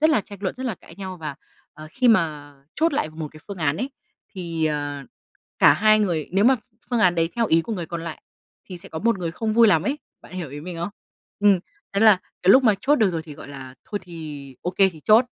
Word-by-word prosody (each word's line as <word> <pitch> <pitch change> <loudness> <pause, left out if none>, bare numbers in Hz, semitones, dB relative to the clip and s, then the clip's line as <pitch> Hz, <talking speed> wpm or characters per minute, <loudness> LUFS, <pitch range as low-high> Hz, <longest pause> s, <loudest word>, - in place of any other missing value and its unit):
rất 315 +1 +5
là 300 - +3
tranh 200 +1 -12
luận, 190 - -1
rất 260 +1 -5
là 225 - -1
cãi 165 - -16
nhau 190 -2 -6
và 150 -4 -6 0.6
khi 250 +4 +2
mà 150 -8 +1 0.2
chốt 325 +1 +2
lại 155 - -1
một 155 -1 -6
cái 155 - -13
phương 200 -2 -6
án 155 -2 +1
ấy, 260 +8 -3 0.4
thì, 170 -3 -3
ờ, 145 -2 -3 0.6
cả - - +7
hai 215 0 +4
người 170 -7 0
nếu 200 +3 +3
mà 265 +2 +6 0.4
phương 240 - +1
án 180 -4 +4
đấy 165 -1 +1
theo 230 -1 +2
ý 165 +1 +4
của 225 - -5
người 175 -5 -4
còn 170 0 -5
lại 165 - -7 0.5
thì 180 -2 -7
sẽ 195 - -8
có 160 - -5
một 230 0 +1
người 170 -2 -2
không 220 +4 -2
vui 230 0 +6
lắm 165 -4 +4
ấy. 275 +8 -1 0.3
Bạn - - -15
hiểu 175 -6 -5
ý 145 +1 -7
mình 175 +2 -7
không? 170 - -2 0.5
Ừm. 200 -2 +5 0.4
Nên 200 - +2
là 210 -4 +7 0.2
cái 185 - +5
lúc 265 - +7
mà 215 -4 +5
chốt 295 +2 +3
được 215 -5 +3
rồi 165 -2 -3
thì, 155 -3 -10
gọi - - -11
là, 130 -2 -9
thôi 205 - -4
thì 150 -6 -9
ô 180 - -1
kê 190 +1 +4
thì 165 -4 -12
chốt, 220 +3 +6
180 Hz, 255 wpm, -23 LUFS, 160-215 Hz, 0.6 s, cả